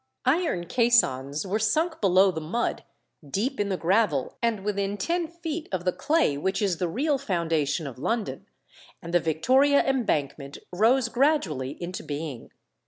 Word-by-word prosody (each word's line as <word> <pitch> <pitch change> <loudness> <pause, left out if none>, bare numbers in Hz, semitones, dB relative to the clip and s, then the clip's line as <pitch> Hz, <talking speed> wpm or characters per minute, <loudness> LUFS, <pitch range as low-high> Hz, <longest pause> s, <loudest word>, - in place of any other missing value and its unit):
Iron 265 - +1
caissons 155 - +2
were 200 +3 -1
sunk 315 +10 0
below 190 -1 +5
the 160 -2 -5
mud, 180 +10 -2 0.5
deep 240 - -2
in 205 -1 0
the 190 - -1
gravel, 175 - +1
and 225 -4 -1
within 200 -1 -1
ten 340 +7 -1
feet 335 -1 -6
of 185 -2 -3
the 180 - +3
clay 300 - +1
which 190 +5 -1
is 195 -5 0
the 180 - -1
real 280 - 0
foundation 165 - -1
of 130 -3 -8
London, 225 - -2 0.6
and 170 +1 -7
the 175 - +5
Victoria 260 - +3
Embankment 150 - -1 0.2
rose 230 +6 +3
gradually 230 - 0
into 180 +1 -5
being. 145 -4 -6
195 Hz, 155 wpm, -26 LUFS, 160-260 Hz, 0.6 s, below